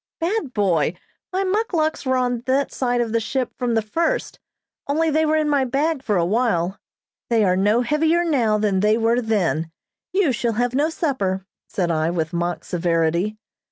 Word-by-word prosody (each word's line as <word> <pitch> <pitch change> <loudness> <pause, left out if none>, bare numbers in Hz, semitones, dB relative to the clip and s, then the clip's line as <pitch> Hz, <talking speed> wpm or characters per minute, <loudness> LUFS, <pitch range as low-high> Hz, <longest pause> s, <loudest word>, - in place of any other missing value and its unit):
"Bad 350 - -1
boy! 180 -6 +1 0.4
My 380 +1 0
muckluks 370 -8 0
were 260 0 +2
on 245 -2 0
that 270 +2 +1
side 245 -2 0
of 230 -2 -2
the 230 - +2
ship 250 +3 -2
from 240 -2 0
the 225 - +1
first, 335 - -1 0.5
only 315 +3 +1
they 315 +1 +2
were 310 - +2
in 310 -1 +1
my 285 -2 +2
bag 280 +4 0
for 210 -7 0
a 170 - +2
while. 195 -3 0 0.5
They 230 -2 +3
are 185 -2 +3
no 205 +5 +3
heavier 315 +6 +2
now 245 -10 +2
than 205 -3 +1
they 210 +2 +3
were 230 +2 +2
then. 185 -8 0 0.4
You 380 -6 +2
shall 235 -1 -1
have 245 +2 0
no 290 +4 +2
supper," 200 - -1 0.2
said 175 -3 -1
I, 160 0 +1
with 165 -1 -2
mock 175 0 -2
severity. 170 +3 0
235 Hz, 185 wpm, -22 LUFS, 190-300 Hz, 0.5 s, They